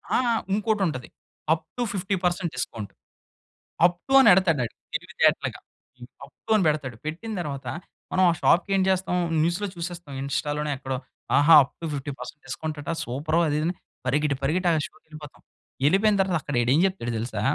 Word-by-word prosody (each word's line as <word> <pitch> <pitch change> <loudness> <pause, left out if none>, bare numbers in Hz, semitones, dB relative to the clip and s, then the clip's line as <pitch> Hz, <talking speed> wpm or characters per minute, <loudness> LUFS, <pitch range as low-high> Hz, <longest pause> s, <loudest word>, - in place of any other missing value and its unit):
ఆ! - - +5 0.4
ఇంకోటుంటది. 195 - 0 0.4
Up 160 - -4
to 245 - -1
50% 180 -2 -1
discount. 115 -4 -5 0.9
Up 175 0 +2
to 270 - -1
అనెడతాడాడు 180 - +4 0.2
తెలివి - - -4
తేటలగా. - - +2 0.4
హ్మ్, 125 0 -11 0.2
అప్ - - -22
టు - - -4
అని 210 - +3
బెడతాడు. 140 -6 -1
పెట్టిన 170 +9 -5
తర్వాత 140 -5 -5 0.4
మనం 185 - +3
ఆ - - 0
షాప్‌కేం 195 +2 +3
చేస్తాం 185 -1 0 0.3
న్యూస్‌లో 175 +6 0
చూసేస్తాం, 170 -3 -6
ఇన్‌స్టా‌లోనో 145 +2 -2
ఎక్కడో, 130 -1 -4 0.4
ఆహా! 150 +3 +7
అప్ 135 - -11
టు - - -4
50% 140 0 -6
డిస్కౌంట్ 155 +4 -4
అట 145 - -8
సూపరు 150 +7 -1
అదిదని 155 +4 0 0.3
పరిగెట్టి, 140 +2 +1
పరిగెట్టి 175 +6 +1
ఆ - - +3
షోకెళ్ళిపోతాం. 155 -2 -14 0.5
ఎళ్ళిపోయిన 200 +5 +4
తర్వాత 185 -3 +1
అక్కడడేం 130 +1 +1
చెప్తాడో 185 -11 -4
తెలుసా, 110 -2 -4
155 Hz, 145 wpm, -25 LUFS, 140-185 Hz, 0.9 s, ఆహా